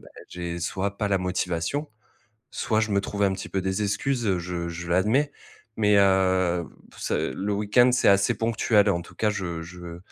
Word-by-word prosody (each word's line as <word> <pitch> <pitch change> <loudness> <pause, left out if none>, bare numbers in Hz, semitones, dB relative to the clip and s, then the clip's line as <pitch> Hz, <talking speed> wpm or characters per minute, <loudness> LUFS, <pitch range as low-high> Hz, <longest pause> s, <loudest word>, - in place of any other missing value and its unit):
bah, - - -15 0.2
j'ai 85 -1 -5
soit 95 +3 -2
pas 105 - 0
la 100 -1 +2
motivation, 90 - -2 0.6
soit 110 - 0
je 110 -1 -1
me 100 - +3
trouve 100 +1 -2
un 95 - +2
petit 95 0 -6
peu 95 - -1
des 95 +2 -1
excuses, 120 +5 -1
heu, 95 -3 +1
je 85 -1 -4
je 85 +1 -6
l'admets. 110 +12 +2 0.5
Mais, 105 -1 +4
heu, 95 -3 +3 0.3
p - - -19
c'est - - -1
le 100 +2 -2
week-end, 105 +5 +4
c'est 125 - +3
assez 100 +4 +4
ponctuel. 110 -2 +2
En 85 -3 -1
tout - - -15
cas, 110 - +1
je 90 -5 -4
je 85 0 -9
95 Hz, 195 wpm, -25 LUFS, 90-105 Hz, 0.6 s, Mais